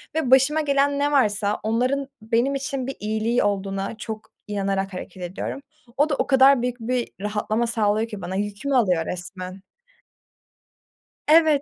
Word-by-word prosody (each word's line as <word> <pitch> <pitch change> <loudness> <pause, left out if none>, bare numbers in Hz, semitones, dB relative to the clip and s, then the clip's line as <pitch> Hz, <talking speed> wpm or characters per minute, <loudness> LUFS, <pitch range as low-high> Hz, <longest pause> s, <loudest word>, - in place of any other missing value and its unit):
ve 285 -6 0
başıma 280 +4 +5
gelen 280 0 +2
ne 290 +1 +1
varsa 210 -6 +2
onların 255 +5 0
benim 235 +5 +1
için 270 -1 -3
bir 270 - -4
iyiliği 220 +3 0
olduğuna 195 +1 -2
çok 220 -2 -7 0.2
inanarak 195 -1 -1
hareket 180 0 -7
ediyorum. 185 +9 -5 0.4
O 295 +2 +3
da 285 - +1
o - - -1
kadar 265 -1 +6
büyük 245 0 -2
bir 245 +1 -1
rahatlama 215 +2 -1
sağlıyor 220 0 +1
ki 210 -3 -7
bana. 185 - -4
Yükümü 205 +7 -2
alıyor 180 -9 +3
resmen. 185 +1 -6 1.7
Evet. 310 -2 +5
230 Hz, 150 wpm, -23 LUFS, 200-275 Hz, 1.7 s, kadar